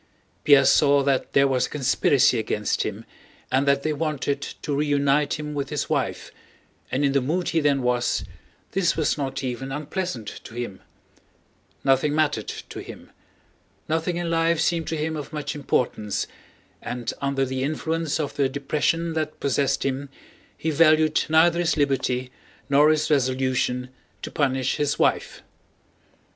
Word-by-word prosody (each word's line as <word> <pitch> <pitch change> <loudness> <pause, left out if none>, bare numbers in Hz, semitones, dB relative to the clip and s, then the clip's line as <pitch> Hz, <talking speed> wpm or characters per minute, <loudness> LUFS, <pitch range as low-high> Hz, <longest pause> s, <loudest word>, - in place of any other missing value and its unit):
Pierre 140 -2 +6
saw 140 0 +5
that 135 -1 0
there 140 0 +5
was 130 -2 +1
a - - -16
conspiracy 135 -2 +3
against 105 -1 -1
him - - -4 0.5
and 135 +2 +2
that 140 0 +3
they 155 - 0
wanted 145 -2 -2
to 145 0 -4
reunite 145 0 +2
him 150 0 -5
with 140 -1 -3
his - - -3
wife, - - -2 0.6
and 140 +3 +1
in 140 - +2
the 140 0 +2
mood 165 +7 -1
he 165 - +1
then 140 -3 +2
was, 125 -1 0 0.5
this 180 -4 +1
was 155 - +1
not 135 -1 -3
even 130 +1 -4
unpleasant 150 - -4 0.2
to 115 - -11
him. 120 -6 -5 1.0
Nothing 135 +2 +2
mattered 155 -1 +1
to - - -7
him. - - -11 0.8
Nothing 165 +2 -1
in 175 -1 -2
life 165 0 +2
seemed 165 0 0
to 160 - -2
him 160 +1 -2
of 150 -1 -6
much 150 -2 -4
importance, 125 -7 -1 0.6
and 120 -1 -4
under 140 -1 0
the 130 0 -3
influence 160 +2 -1
of 145 -3 -3
the 140 -2 +1
depression 150 +4 -1
that 155 -1 -3
possessed 140 0 0
him 135 +1 -2 0.5
he 160 - -1
valued 155 0 +4
neither 165 +2 +4
his 170 -2 +1
liberty 130 -3 0 0.4
nor 145 +2 +5
his 155 0 +1
resolution 130 -2 0 0.3
to - - -5
punish 130 -3 0
his 145 0 0
wife. - - 0
140 Hz, 155 wpm, -24 LUFS, 135-155 Hz, 1.0 s, Pierre